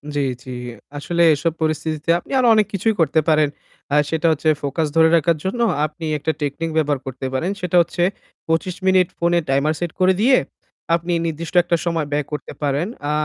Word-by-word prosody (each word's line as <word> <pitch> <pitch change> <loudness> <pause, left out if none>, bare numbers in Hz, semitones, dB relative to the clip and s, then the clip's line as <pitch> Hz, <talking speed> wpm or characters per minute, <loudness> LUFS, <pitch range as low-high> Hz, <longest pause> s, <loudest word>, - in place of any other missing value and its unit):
জ্বি, 145 - +1 0.2
জ্বি। 130 -2 -7 0.4
আসলে 170 +4 -1
এসব 160 +3 -1
পরিস্থিতিতে 155 0 -2
আপনি - - -15
আরো 250 - +3
অনেক 215 -1 +3
কিছুই 215 +3 +1
করতে 160 -1 +3
পারেন। 155 -2 +3 0.4
আ - - +4
সেটা 160 +2 0
হচ্ছে 155 0 +1
ফোকাস 150 +3 -1
ধরে 160 0 +6
রাখার 165 0 +2
জন্য 195 +6 -2 0.2
আপনি 155 +2 -7
একটা 160 +2 -1
টেকনিক 145 +3 -2
ব্যবহার 145 -3 +1
করতে 130 0 -6
পারেন। 165 +8 -1
সেটা 180 -1 -2
হচ্ছে 175 +1 -1 0.4
২৫ 165 +2 0
মিনিট 185 -1 +4
ফোনে 170 0 +2
টাইমার 140 +3 +2
সেট 175 -2 -3
করে 185 0 +4
দিয়ে, 255 +3 +5 0.6
আপনি 170 +1 -3
নির্দিষ্ট 165 +1 -4
একটা 170 - +1
সময় 165 -3 -1
ব্যয় 145 0 0
করতে 150 - -5
পারেন। 145 +4 0 0.2
আ - - +1
160 Hz, 185 wpm, -20 LUFS, 150-175 Hz, 0.6 s, ধরে